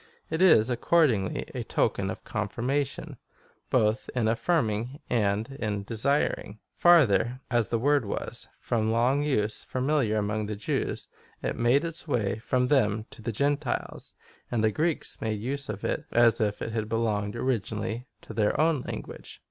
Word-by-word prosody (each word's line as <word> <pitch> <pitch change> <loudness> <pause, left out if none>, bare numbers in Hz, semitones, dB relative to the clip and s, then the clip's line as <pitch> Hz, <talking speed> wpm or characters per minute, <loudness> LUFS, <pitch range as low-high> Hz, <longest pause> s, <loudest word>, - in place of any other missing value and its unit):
^ - - -27 0.3
It 160 +2 -1
is, 130 -11 +6
accordingly, 120 - +2
a - - -3
token 95 -1 0
of - - -6
confir 110 +2 -4
mation,^ 140 +1 -2 0.5
both 110 0 +1
in 120 -3 +1
affirming, 120 0 0
and 105 -1 +1
in 105 -2 -2
desiring.® 115 -1 0 0.2
Farther, 125 - +4
as 120 -4 +2
the 115 - +1
word 145 +1 +2
was, 100 - -4
from 110 -2 0
long 125 +5 +2
use, 110 -8 0
familiar 130 -4 0
among 105 0 -1
the 105 - -3
Joavs, 100 - -2 0.4
it - - -1
made 125 +7 +3
its 165 0 -6
way 110 -8 0
from 125 +2 0
them 110 -6 +2
to 135 -4 -11
the 115 +2 -3
Gentiles, 140 +4 -2 0.3
and 115 -3 0
the 110 - +3
Greeks 160 +7 -1
made 110 -2 -1
use 135 +4 -3
of 105 -1 -5
it - - -1
as 120 0 +4
if 105 -1 -1
it 115 - -4
had 110 -1 -2
belonged 110 -2 -1
originally 115 -1 -2 0.2
to - - -9
their 105 -2 +1
own 155 -3 +3
language. - - -7
115 Hz, 165 wpm, -27 LUFS, 105-135 Hz, 0.5 s, is